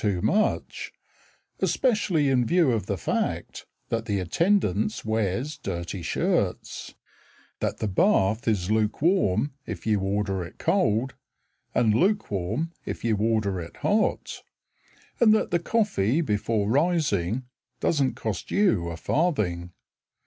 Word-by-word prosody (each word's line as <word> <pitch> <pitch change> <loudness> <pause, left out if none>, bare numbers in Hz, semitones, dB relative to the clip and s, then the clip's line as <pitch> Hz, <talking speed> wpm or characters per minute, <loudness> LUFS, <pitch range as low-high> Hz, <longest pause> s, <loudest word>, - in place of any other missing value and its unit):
too 100 -4 +1
much, 210 - 0 0.7
Especially 205 - +1
in 130 -2 +3
view 165 +1 +3
of 115 -3 -1
the - - -1
fact - - -3 0.2
That 115 -1 -1
the 100 -3 -1
attendance 110 - +1
wears 110 +6 -1
dirty 85 0 -4
shirts, 85 - -1 0.6
That - - -2
the 110 - -2
bath 110 - +2
Is 100 -3 +1
lukewarm 115 - +1
if 105 -6 -6
you 105 -2 +2
order 95 -1 -1
it 85 - -11
cold 115 +5 +1 0.6
And 115 -3 +3
lukewarm 150 - 0
if - - -6
you 115 -2 +2
order 105 -3 0
it 85 - -10
hot; 215 +1 0 0.8
And 220 -2 +6
that - - 0
the 175 - +2
coffee 170 - +1
before 105 -5 0
rising 130 - +1 0.4
Doesn't 140 -5 +1
cost 110 -3 -4
you 150 - +2
a 85 -1 -5
farthing. 90 - 0
110 Hz, 125 wpm, -26 LUFS, 100-165 Hz, 0.8 s, And